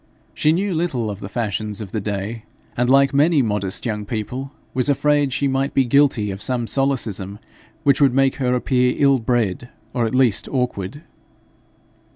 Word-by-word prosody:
She 155 - +2
knew 190 +4 0
little 140 -10 -1
of 100 - -7
the - - -7
fashions 105 -2 -3
of 105 -4 -7
the 110 - -2
day, 105 +3 -4 0.3
and, 125 +1 +1
like 140 +1 +4
many 145 0 +4
modest 105 -4 -2
young 105 -3 -2
people, 125 +6 -5 0.2
was 130 +2 0
afraid 145 0 +2
she 140 +2 0
might 135 +1 -1
be 135 - +4
guilty 125 -5 +2
of 95 +1 -7
some 125 -2 -1
solecism 115 -8 -1 0.5
which 140 -1 +3
would 140 -2 +5
make 135 -1 +2
her 125 -2 +1
appear 125 0 +1
ill 140 -2 +4
bred, 120 -1 -1 0.2
or 120 -2 +1
at 110 - -3
least 125 -5 +2
awkward. 125 - -3
125 Hz, 175 wpm, -21 LUFS, 110-140 Hz, 0.5 s, would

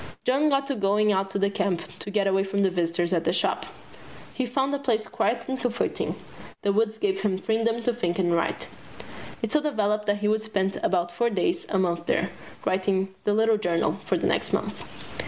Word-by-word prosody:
John 280 +4 +3
got 275 -1 +2
to 275 - -1
going 210 0 +2
out 195 0 +1
to 195 - -2
the 200 0 +1
camp 200 -4 0 0.2
to - - -6
get 205 -1 +1
away 195 0 +3
from 200 +1 0
visitors 175 0 0
at 170 -2 +1
the - - +2
Shop. - - 0 0.7
He 255 - -1
found 270 +3 0
the 285 - 0
place 230 -6 0
quiet 235 0 -1
and 265 0 -2
comforting. 240 -1 -1 0.5
The 200 - +2
woods 220 +1 +1
gave 195 -2 0
him 195 -2 +1
freedom 225 +3 0
to 245 - +1
think 175 -7 -1
and 175 -3 +2
write. 170 0 0 0.8
It - - -1
so 305 - +3
developed 210 -7 0
that 205 0 +2
he 210 0 -1
would 215 +1 +2
spend 195 -3 -1
about 175 -2 +1
four 235 +7 +1
days 200 -5 0
a 195 - +1
month 170 -2 0
there, 180 +3 +1 0.3
writing 190 0 +1
the 205 - +3
"Little 220 0 +4
Journey" 175 -4 +1
for - - +1
the - - -2
next - - 0
month. - - -2
205 Hz, 210 wpm, -26 LUFS, 190-225 Hz, 0.8 s, Little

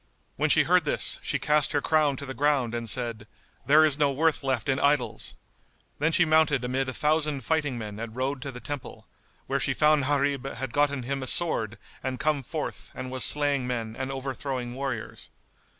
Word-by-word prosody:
When - - +1
she - - +5
heard - - +4
this, - - -1
she - - -1
cast 150 -1 +1
her 145 - +3
crown 150 -1 +2
to 140 - -6
the 135 - -5
ground 135 -3 +1
and 120 -1 -3
said, 115 -2 -2 0.4
"There 155 +2 +7
is 150 -1 +2
no 145 -2 +3
worth 155 +3 +1
left 135 +1 -1
in 135 -1 +1
idols!" 140 -6 0 0.6
Then 160 +3 +2
she 175 +1 +4
mounted 155 -4 +3
amid 130 +2 -1
a - - -4
thousand 150 -2 +1
fighting 145 -1 0
men 105 -2 -6
and 115 -1 -6
rode 130 +1 -2
to 135 - -5
the 125 - -9
temple, 145 0 -7 0.4
where - - -1
she - - 0
found 150 -2 +4
Gharib 140 -1 0
had 130 0 -5
gotten 145 -2 +1
him 135 +2 -3
a 130 - -4
sword 115 -10 +1 0.2
and 130 -1 -3
come 150 -2 +1
forth 130 - -5
and 130 0 -6
was 130 0 +1
slaying 145 -3 +2
men 115 -3 -3
and 130 +1 -4
overthrowing 130 -2 -4
warriors. 130 -4 -5
135 Hz, 200 wpm, -27 LUFS, 125-145 Hz, 0.6 s, There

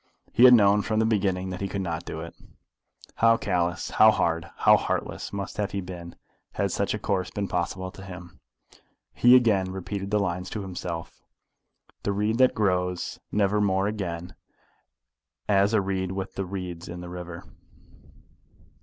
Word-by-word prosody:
He 120 - +7
had 125 -1 +10
known 105 -2 +5
from 110 +1 -2
the 110 - +3
beginning 95 -4 0
that 90 - -6
he 100 - -1
could 100 +1 -4
not 85 -1 -4
do 80 - -5
it. 85 0 -8 0.8
How 115 0 +5
callous, 90 -3 -1
how 110 - +7
hard, 85 -5 0
how - - +6
heartless, - - -3
must 100 -1 -5
he 100 -1 -2
have 95 - -4
been, 85 -2 -8 0.4
had - - -1
such - - -1
a - - -2
course 95 -2 -1
been 100 -2 -3
possible 95 +1 -3
to 95 - -12
him! 90 -2 -10 0.7
He 120 +1 +6
again 105 -7 +3
repeated 95 +1 -5
the 105 +1 +2
lines 90 -2 -2
to 105 - -4
himself 90 -3 -6 0.8
The 100 - -1
reed 105 +4 0
that 130 -1 +5
grows 90 -3 -1
never 105 0 +2
more 95 -1 +2
again 90 -5 -4 1.1
As 100 0 +3
a 110 -3 +3
reed 95 -1 -2
with 95 0 -5
the 95 - -3
reeds 90 -2 -6
in 85 +1 -7
the 90 - -8
river. 90 -1 -7
95 Hz, 170 wpm, -26 LUFS, 90-105 Hz, 1.1 s, had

